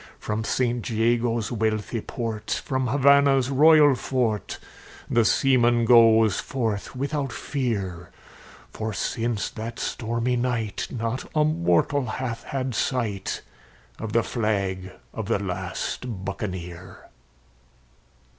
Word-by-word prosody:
From 105 +1 -3
St 120 0 -1
Jago's 115 0 +1
wealthy 110 0 -1
port, 115 -4 -3
from 130 -2 -1
Havannah's 140 0 +4
royal 150 +1 +6
fort, 120 -4 -1 0.5
The 115 - +3
seaman 120 0 +3
goes 115 -3 +6
forth 115 -4 -3
without 140 0 -2
fear; 100 - -3 0.6
For 110 0 -4
since 115 +1 -2
that 115 +1 -6
stormy 115 +2 -1
night 120 -4 -2
not 115 +1 -3
a 155 - +4
mortal 130 - +1
hath 115 +1 -4
had 130 -2 -3
sight 110 -4 -2 0.6
Of 110 - -5
the 115 0 +3
flag 100 -5 -2 0.2
of 110 -3 -5
the 115 - +2
last 100 +2 -4
Buccaneer. 90 -2 -6
115 Hz, 110 wpm, -25 LUFS, 105-130 Hz, 0.6 s, royal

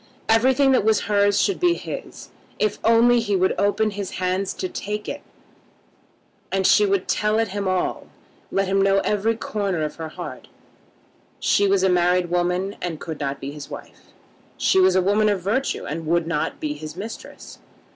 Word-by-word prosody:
Everything 260 +5 +4
that 255 - +3
was 220 0 +3
hers 205 0 +2
should 395 - +1
be 350 -1 +3
his, - - -8 0.3
if 210 -1 0
only 235 +2 +5
he 205 -3 0
would 185 0 +2
open 205 +2 +1
his 200 -1 -5
hands 185 +1 -1
to 185 - -3
take 210 +3 -5
it. - - -5 1.3
And 190 0 0
she 210 +2 +5
would 195 -1 0
tell 210 +1 +1
it 225 -1 +1
him 200 0 -3
all, 185 -1 -1 0.4
let 195 - +1
him 195 +1 +2
know 195 0 +3
every 210 +2 0
corner 200 -7 -2
of 150 - -4
her 160 -1 -5
heart. - - -8 0.9
She 200 - +2
was 195 -1 +2
a - - +4
married 180 -1 +2
woman, 180 +3 0
and 170 -4 -4
could 160 -3 -6
not 140 -1 -3
be 135 - -6
his 150 -1 -9
wife. - - -11 0.5
She 190 - +3
was 185 0 +4
a 185 - +3
woman 210 +3 +3
of 200 -3 0
virtue, 255 +8 -1
and 160 +1 -5
would 170 0 +2
not 165 -2 -2
be 150 -1 -2
his 155 +1 -8
mistress. 215 +4 -9
195 Hz, 185 wpm, -22 LUFS, 180-210 Hz, 1.3 s, only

